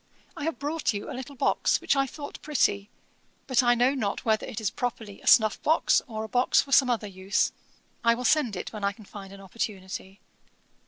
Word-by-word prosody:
I 285 - -5
have 325 - -2
brought 295 -2 -1
you 205 - -5
a - - -5
little 265 +2 -7
box, - - +1
which - - +1
I 275 0 +2
thought 285 +2 -9
pretty; 205 -9 0 0.6
but 255 -2 +3
I 240 -1 +4
know 250 +3 +3
not 215 -8 -3
whether 220 -1 +1
it 220 - -5
is 215 -3 -1
properly 225 -4 -5
a - - -13
snuff 215 -2 +5
box, 320 +2 +3
or 220 -2 -5
a - - -5
box 245 +3 +3
for 275 - -1
some 265 -2 +5
other 230 -3 0
use. 195 0 0 0.5
I 230 0 +4
will 250 +1 -5
send 245 -4 +2
it, - - -6
when 210 -2 -7
I 200 0 +1
can 215 0 -15
find 195 -1 -10
an 195 0 -11
opportunity. 195 -1 -6
230 Hz, 215 wpm, -27 LUFS, 200-260 Hz, 0.6 s, snuff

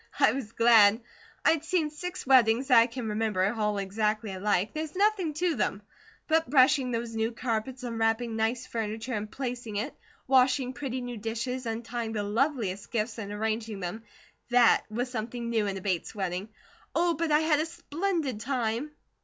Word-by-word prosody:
I - - +6
was 255 -5 -5
glad. 225 -2 +6 0.5
I'd 320 -1 +4
seen 325 -3 0
six 360 +4 -6
weddings 255 -1 +4
that 245 -3 +8
I 230 - +5
can 240 -1 -5
remember, 210 -2 0
all 210 -2 0
exactly 210 +2 -1
alike 195 +1 0
there's 310 +2 -4
nothing 390 -6 +1
to 345 +2 +1
them; 210 -4 -1 0.4
but 320 -4 +2
brushing 265 -1 +4
those 230 -1 -3
new 225 +1 0
carpets, 240 +2 -3
unwrapping 225 0 0
nice 225 +3 0
furniture 225 +2 -4
and 210 0 -3
placing 245 -4 -5
it, 220 +8 -2 0.3
washing 260 0 +3
pretty 260 -1 -4
new 245 -1 -5
dishes, 235 +3 -3
untying 230 0 -3
the 210 -2 -1
loveliest 210 -3 -1
gifts 225 0 -2
and 205 -2 -5
arranging 220 0 -2
them 185 +5 -5 0.5
THAT 245 -1 +5
was 245 +3 -3
something 235 0 -4
new 220 -3 +1
in 195 -1 -2
a - - -7
Bates 185 +1 -2
wedding. 190 +1 -3 0.5
Oh, 345 0 +3
but 325 0 -1
I 300 +1 +5
had 310 -2 +3
a 315 - 0
splendid 330 - -2
time!" 240 +2 -1
235 Hz, 170 wpm, -28 LUFS, 215-265 Hz, 0.5 s, that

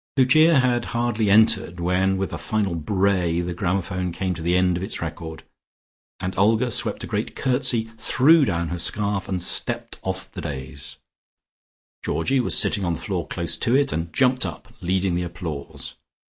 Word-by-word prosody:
Lucia 155 +5 +5
had 120 -2 +1
hardly 115 -3 0
entered 105 -4 +3
when 95 +2 +1
with 95 0 -3
a - - -3
final 105 -4 -1
bray 90 0 0
the 90 0 -3
gramophone 90 0 -2
came 90 +2 -2
to 85 - -8
the 85 +2 +1
end 90 -1 +2
of 90 - -4
its 95 - -4
record, 80 -1 -6 0.8
and 90 0 -4
Olga 115 +5 +3
swept - - +2
a - - -3
great - - -3
curtsey, 125 -3 +1
threw 145 +8 +5
down 85 - -1
her 85 - -4
scarf, 100 +1 -1
and 90 -2 -1
stepped - - -1
off 95 0 -5
the - - -7
dais. 70 0 -4 1.1
Georgie 130 +12 0
was 125 - +2
sitting 100 - +3
on 85 -2 0
the - - -8
floor - - -3
close - - -1
to 120 - +2
it, 140 +1 +2
and 80 +2 -3
jumped 130 -1 +2
up, 85 -5 -7
leading 95 +1 0
the 90 - 0
applause. 85 -4 -6
95 Hz, 175 wpm, -23 LUFS, 85-115 Hz, 1.1 s, Lucia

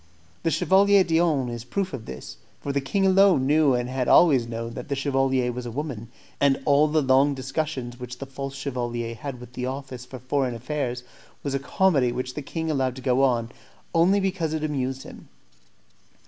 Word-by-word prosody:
The - - +1
Chevalier 195 +5 +4
d'Eon 160 -6 +2
is 120 -1 -5
a 120 - -14
proof 195 +4 -2
of 120 -4 -6
this, 65 - -8 0.2
for 140 - -4
the 140 - +1
king 195 +9 0
alone 190 -7 +5
knew 145 -2 +4
and 120 0 -1
had 130 0 -2
always 135 -9 +5
known 115 0 -5
that 125 +4 -8
the 140 - 0
chevalier 135 -2 +1
was 125 0 -6
a - - -5
woman, 125 -4 -5 0.3
and 140 -1 +3
all 145 +1 +5
the 155 0 +1
long 135 +2 +4
discussions 130 -2 -4
which 125 0 -7
the 135 - -6
false 135 0 -6
chevalier 120 -4 -3
had 125 +2 -7
with 125 0 -12
the 125 0 -3
office 130 -2 -6
for 130 - -8
foreign 130 0 -1
affairs 125 0 -3 0.4
was 140 - -2
a 140 - 0
comedy 140 -2 +2
which 125 +1 -4
the 150 - -5
king 160 +3 -3
allowed 130 -4 0
to 130 - -8
go 130 +1 +2
on, 120 -3 +1 0.4
only 180 +4 +4
because 185 -5 -1
it 155 - -3
amused 135 -3 -2
him. - - -12
135 Hz, 200 wpm, -25 LUFS, 125-150 Hz, 0.4 s, alone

